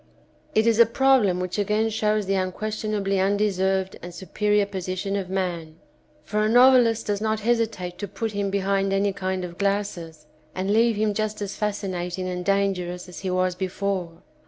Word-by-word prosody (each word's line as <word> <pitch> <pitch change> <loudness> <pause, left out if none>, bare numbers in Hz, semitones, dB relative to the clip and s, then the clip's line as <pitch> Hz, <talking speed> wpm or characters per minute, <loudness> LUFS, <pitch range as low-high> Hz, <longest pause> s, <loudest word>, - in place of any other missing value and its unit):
It 220 +1 +4
is 230 -1 +3
a 235 - +8
problem 230 -7 +3
which 185 +2 -3
again 210 +2 +1
shows 215 -1 0
the 195 - 0
unquestionably 200 +1 -1
undeserved 190 -1 +1
and 175 0 -9
superior 205 +3 +1
position 190 0 -3
of 190 -2 -3
man, 175 -4 -3 0.5
for 210 +1 -1
a 215 - +2
novelist 245 -2 +5
does 205 -1 -1
not 220 0 0
hesitate 220 -6 -1
to 205 - -4
put 220 +4 -4
him 200 -1 -2
behind 195 0 0
any 200 0 +1
kind 190 -1 -3
of 175 -1 -10
glasses, 195 -6 -2 0.3
and 190 +2 -1
leave 230 +1 +3
him 210 0 +1
just 215 +1 -2
as 200 -2 -4
fascinating 185 -3 -3
and 180 0 -3
dangerous 185 -2 -1
as 180 - -9
he 190 - -3
was 185 0 +1
before. 185 -1 -3
195 Hz, 170 wpm, -24 LUFS, 185-215 Hz, 0.5 s, a